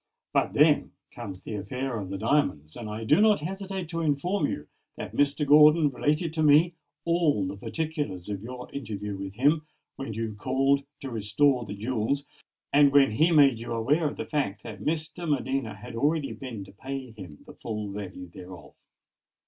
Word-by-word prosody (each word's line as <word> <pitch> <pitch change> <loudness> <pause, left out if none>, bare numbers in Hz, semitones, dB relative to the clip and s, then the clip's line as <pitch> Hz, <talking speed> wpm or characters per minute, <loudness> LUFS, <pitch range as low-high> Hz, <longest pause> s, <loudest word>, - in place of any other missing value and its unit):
But - - +1
then - - +4 0.2
comes 95 -2 -8
the - - -6
affair 120 +5 -3
of 95 -3 -6
the 100 - -3
diamonds; 110 - 0
and 115 -3 -6
I 110 +1 -5
do 150 - +4
not 210 -6 +4
hesitate 190 +1 -4
to 165 0 -2
inform 155 +3 +1
you 75 - -5 0.3
that - - -7
Mr. 145 +1 +2
Gordon 150 +1 +6
related 150 +4 0
to 160 - -1
me 155 +3 +5 0.3
all 165 - +2
the 95 +1 -4
particulars 145 - -4
of 100 -2 -4
your 125 +2 -8
interview 105 -6 -4
with 95 0 -6
him, 150 +6 +2 0.3
when 125 -6 -5
you 110 -1 -3
called 135 +6 +1 0.2
to 135 - -6
restore 120 +4 +2
the 100 - -6
jewels, 125 +5 -1 0.5
and 145 -1 +6
when 140 -3 +5
he 155 +10 +3
made 140 -7 +5
you 115 - -4
aware 145 +8 +2
of 145 - -5
the - - -4
fact 105 -10 -2
that 110 -3 -8
Miss 155 0 0
de 175 +1 -8
Medina 135 -5 -1
had 120 +2 -10
already 145 +4 0
been 120 -7 -7
to 95 - -13
pay 130 +4 -6
him 90 -9 -11
the - - -12
full 105 -2 -5
value 95 -2 -7
thereof." 85 -3 -12
135 Hz, 185 wpm, -27 LUFS, 105-150 Hz, 0.5 s, Gordon